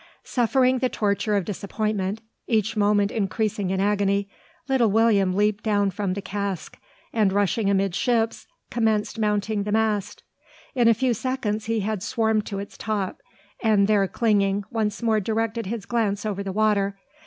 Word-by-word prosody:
Suffering 255 +1 +2
the 255 0 +1
torture 205 -1 0
of 195 - -1
disappointment, 205 0 -2 0.3
each 220 -1 +1
moment 205 -1 +2
increasing 210 -1 -1
in 190 0 -1
agony, 200 0 +1 0.4
little 260 -5 +3
William 205 -3 +3
leaped 210 +1 +1
down 205 -2 +2
from 190 0 -2
the 200 - -5
cask; 200 -2 -4 0.3
and, 215 -4 +3
rushing 200 +1 +1
amidships, 200 +4 0 0.2
commenced 220 -2 0
mounting 210 0 0
the 205 +1 -3
mast. 215 -2 0 0.5
In 245 -3 +3
a 230 - +6
few 250 +2 +1
seconds 220 -3 -2
he 225 -1 0
had 210 -1 -2
swarmed 220 0 0
to 200 - -4
its 200 +1 -8
top: 210 - -3 0.4
and, 215 -3 +4
there 205 -2 +3
clinging, 200 -2 +1
once 220 0 -2
more 220 -2 +3
directed 225 +1 -2
his 220 -1 -4
glance 215 -4 -1
over 200 -2 -2
the 195 -1 -4
water. 200 -1 +1
210 Hz, 155 wpm, -24 LUFS, 200-225 Hz, 0.5 s, a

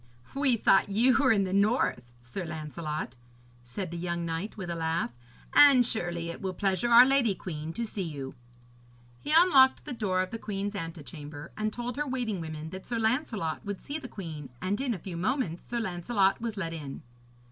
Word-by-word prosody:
'We 275 -3 +2
thought 195 -2 +4
you 235 +5 +4
were 270 -1 +4
in 205 -3 +3
the 185 -1 -2
north, 210 +5 +2 0.2
Sir 125 +10 -5
Lancelot,' 155 -4 -5 0.5
said 165 +9 -5
the 170 - -5
young 170 0 -2
knight, 165 +7 -4
with 180 -4 -4
a - - -2
laugh, 160 -5 -1 0.4
'and 275 -4 +8
surely 175 -7 -2
it - - -9
will 190 -1 -3
pleasure 195 +3 0
our 240 +1 +9
lady 260 -6 +3
queen 160 -3 -5
to 235 +4 -2
see 210 -2 -4
you.' 145 -6 -5 0.9
He 295 - -4
unlocked 305 -6 +6
the - - -5
door 190 -5 0
of 185 - -8
the 225 - -5
queen's 200 -1 -3
antechamber, 155 -4 -7
and 215 0 -1
told 240 +2 -5
her 295 0 -1
waiting 240 -8 -2
woman 155 0 -6
that 190 0 -8
Sir 235 - -2
Lancelot 220 - -1
would 200 -2 -4
see 290 +2 -5
the 260 - -8
queen, 160 - -7
and 200 - -1
in 255 -4 0
a - - -5
few 175 0 -7
moments 190 - -1
Sir 240 - -2
Lancelot 195 +1 +1
was 225 -3 -3
let 165 -4 -3
in. 145 -4 -7
195 Hz, 195 wpm, -29 LUFS, 165-235 Hz, 0.9 s, our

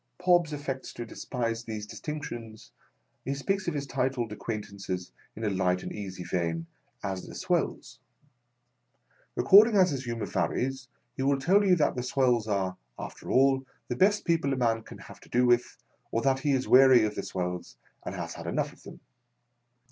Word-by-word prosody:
Pobbs 175 -3 +3
affects 140 -3 -5
to 120 - -6
despise 115 -1 -3
these 110 -2 -5
distinctions. 120 -6 -7 0.5
He 135 - -2
speaks 195 +7 -1
of 170 - -1
his 140 -1 -2
titled 130 -4 -1
acquaintances, 100 -4 -5 0.2
in 110 - -7
a 105 - +1
light 90 -1 +1
and - - -5
easy 95 -3 -6
vein, 85 -2 -2 0.4
as 95 -1 -4
"the - - -10
swells." 170 -6 -2 1.4
Accord 205 +3 +8
ing 220 -3 +1
as 185 -3 +5
his 135 -2 -3
humour 115 -2 -3
varies, 130 +1 -1 0.3
he - - -4
will 135 +1 +3
tell 190 +9 +4
you 190 -2 +5
that 155 - +1
the 125 - -2
swells 125 -3 +1
are, 95 -3 -1 0.2
after - - -8
all, 135 0 +4 0.3
the 125 - -1
best 205 +9 +3
people 165 -5 +1
a - - -2
man 115 -2 +1
can - - -12
have - - -13
to - - -18
do 125 +1 +3
with, 120 0 +2 0.3
or 115 - -1
that 135 -1 +2
he 145 0 +1
is 130 -1 0
weary 130 -2 +7
of 105 - -2
the - - -3
swells 90 -1 -4 0.3
and - - -5
has - - -5
had - - -8
enough - - -1
of - - -20
them. - - -12
125 Hz, 185 wpm, -28 LUFS, 110-140 Hz, 1.4 s, Accord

